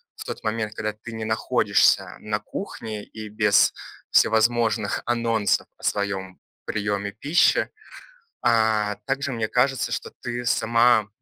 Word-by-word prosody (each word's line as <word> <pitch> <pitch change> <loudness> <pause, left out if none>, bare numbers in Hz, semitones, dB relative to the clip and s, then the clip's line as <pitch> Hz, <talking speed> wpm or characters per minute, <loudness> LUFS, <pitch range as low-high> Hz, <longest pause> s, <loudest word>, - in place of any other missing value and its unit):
в - - -8
тот - - -7
момент, 110 -1 -2
когда 110 -1 -3
ты 115 +2 -10
не 110 -1 -4
находишься 110 0 +2
на 105 -1 -2
кухне, 110 - -6
и 110 -1 -9
без 105 -1 +3 0.4
всевозможных 110 -1 +2
анонсов 115 -3 +1
о - - -21
своём 95 -2 -2 0.3
приеме 100 -1 -2
пищи. 145 - +2 0.7
А, 110 -3 +2
также, 140 0 -1
мне 115 -2 -2
кажется, 130 +3 +1
что - - -4
ты 120 0 -4
сама 115 -1 +3
110 Hz, 130 wpm, -24 LUFS, 105-120 Hz, 0.7 s, без